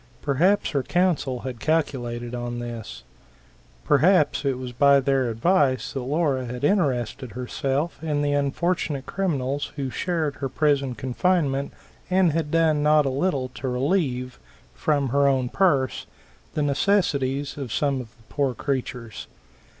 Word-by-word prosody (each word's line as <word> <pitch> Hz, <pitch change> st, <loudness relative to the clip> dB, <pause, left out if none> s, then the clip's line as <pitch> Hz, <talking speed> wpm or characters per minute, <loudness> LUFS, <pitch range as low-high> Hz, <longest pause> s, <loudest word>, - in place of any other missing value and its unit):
Perhaps 175 Hz, +9 st, +2 dB
her 140 Hz, -, +1 dB
counsel 150 Hz, -6 st, 0 dB
had 125 Hz, -2 st, -6 dB
calculated 120 Hz, -6 st, -1 dB
on 120 Hz, 0 st, -4 dB
this. 115 Hz, -, -7 dB, 0.8 s
Perhaps 150 Hz, +1 st, +3 dB
it 135 Hz, -3 st, 0 dB
was 125 Hz, -1 st, -6 dB
by 140 Hz, +3 st, +5 dB
their 135 Hz, -2 st, +1 dB
advice 130 Hz, -, +1 dB
that 135 Hz, -, -2 dB
Laura 135 Hz, 0 st, 0 dB
had 125 Hz, +2 st, -6 dB
interested 135 Hz, -, 0 dB
herself 135 Hz, +6 st, -2 dB
in 150 Hz, -2 st, 0 dB
the 145 Hz, 0 st, +1 dB
unfortunate 145 Hz, 0 st, -1 dB
criminals 145 Hz, -7 st, -2 dB
who 135 Hz, -3 st, -3 dB
shared 160 Hz, -4 st, -2 dB
her 135 Hz, -, -3 dB
prison 140 Hz, -3 st, +1 dB
confinement, 140 Hz, +2 st, 0 dB, 0.4 s
and 185 Hz, -2 st, +4 dB
had 160 Hz, -1 st, -1 dB
done 160 Hz, -2 st, +2 dB
not 150 Hz, 0 st, +4 dB
a -, -, +1 dB
little 135 Hz, -2 st, -1 dB
to 130 Hz, +1 st, -6 dB
relieve, 130 Hz, -1 st, -1 dB, 0.3 s
from 145 Hz, -3 st, 0 dB
her 140 Hz, +2 st, +3 dB
own 130 Hz, -3 st, +1 dB
purse, 140 Hz, -9 st, +1 dB, 0.5 s
the 150 Hz, -, +1 dB
necessities 140 Hz, -4 st, +1 dB
of 135 Hz, -5 st, -6 dB
some 140 Hz, 0 st, 0 dB
of 120 Hz, -, -9 dB
the 115 Hz, -, -23 dB
poor 140 Hz, -4 st, -1 dB
creatures. 125 Hz, -4 st, -4 dB
140 Hz, 140 wpm, -24 LUFS, 125-155 Hz, 0.8 s, by